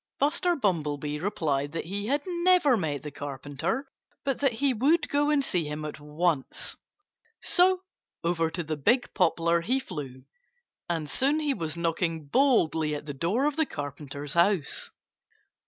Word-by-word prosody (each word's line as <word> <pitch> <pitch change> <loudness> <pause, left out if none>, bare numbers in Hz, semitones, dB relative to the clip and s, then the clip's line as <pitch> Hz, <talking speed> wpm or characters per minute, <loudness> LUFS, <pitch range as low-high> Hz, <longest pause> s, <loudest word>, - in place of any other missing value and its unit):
Buster 335 +5 +2
Bumblebee 150 - -1
replied 150 -6 -1
that 165 - -3
he 200 +4 -4
had 285 +3 +1
never 350 -5 +4
met 150 - -2
the 150 - -6
Carpenter, 145 - -3 0.4
but 275 -2 0
that 275 -4 +2
he 270 +3 +1
would 290 +9 +3
go 290 +1 +2
and 295 -2 +3
see 175 - 0
him 150 +1 -4
at 150 - -6
once. 150 -1 -1 0.7
So 365 +1 +4 0.4
over 165 -1 +1
to 175 +1 -4
the 155 -1 -3
big 240 - +2
poplar 170 -2 +2
he 255 +10 +1
flew. 140 - -7 0.7
And 165 -3 -1
soon 280 - +2
he 295 -2 +1
was 165 -7 -3
knocking 165 -1 -1
boldly 160 - +2
at 145 - -6
the 145 - -5
door 185 - 0
of 295 0 0
the 320 - +3
Carpenter's 145 0 -5
house. 170 -3 +1
170 Hz, 155 wpm, -28 LUFS, -, 0.7 s, never